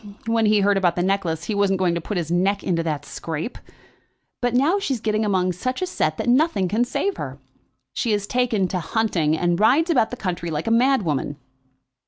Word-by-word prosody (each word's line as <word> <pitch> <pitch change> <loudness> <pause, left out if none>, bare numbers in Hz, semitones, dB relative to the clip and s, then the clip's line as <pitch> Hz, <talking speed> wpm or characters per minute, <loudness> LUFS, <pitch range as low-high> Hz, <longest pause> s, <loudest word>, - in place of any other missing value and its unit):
When 230 -1 +2
he 210 -1 +4
heard 200 0 +3
about 175 -3 +2
the 175 - 0
necklace 185 -4 -1
he 220 - -3
wasn't 200 -1 +2
going 180 -2 +1
to 170 - -2
put 200 +4 -4
his 165 -1 -3
neck 195 +3 +1
into 170 -2 0
that 155 -3 -3
scrape. 165 +8 -5 0.8
But 245 -1 0
now 310 +10 +3
she's 275 - -2
getting 215 0 0
among 185 -3 +1
such 255 +9 -3
a - - +2
set 155 - -1
that - - -3
nothing 250 - +3
can 215 +6 +1
save 390 +10 -2
her. 135 -1 -6 0.6
She 235 - -1
has 205 -1 -1
taken 235 -4 +1
to 185 - -1
hunting, 170 -4 0
and 175 +1 0
rides 290 - +4
about 245 -8 +3
the 250 - -6
country 175 -5 -3
like 155 0 -3
a 225 - 0
madwoman." 225 - +1
200 Hz, 210 wpm, -22 LUFS, 175-235 Hz, 0.8 s, he